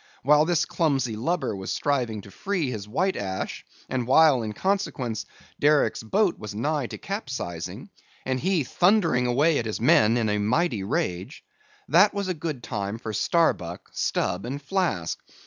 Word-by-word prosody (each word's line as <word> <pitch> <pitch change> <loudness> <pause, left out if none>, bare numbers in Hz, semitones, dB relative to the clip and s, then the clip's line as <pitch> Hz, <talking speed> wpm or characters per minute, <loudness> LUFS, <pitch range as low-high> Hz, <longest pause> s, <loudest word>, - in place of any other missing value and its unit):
While 150 +3 +5
this 170 -1 +2
clumsy 135 -9 0
lubber 135 0 -1
was 95 -1 -5
striving 125 -7 -1
to 100 - -14
free 180 - -2
his 105 -4 -6
white 185 - 0
ash, 95 -2 -4 0.2
and 125 -2 -2
while, 145 -1 +5
in 110 -1 -3
consequence, 135 - -2 0.3
Derick's 145 -6 +3
boat 190 - +1
was 105 -1 -7
nigh 145 +3 -1
to - - -7
capsizing, 110 - -5 0.4
and 130 0 -1
he 180 0 +1
thundering 175 - +2
away 145 +6 +3
at 115 - -3
his 110 - -3
men 115 -1 +4
in 115 -2 +1
a 105 0 0
mighty 120 - +1
rage;—that 105 - -1
was 200 -1 -2
a 185 - 0
good 155 -6 -5
time 100 -2 -3
for 110 -2 -6
Starbuck, 100 - 0
Stubb, 90 -1 -1
and 135 +4 -4
Flask. 145 - -1
130 Hz, 160 wpm, -25 LUFS, 110-165 Hz, 0.4 s, While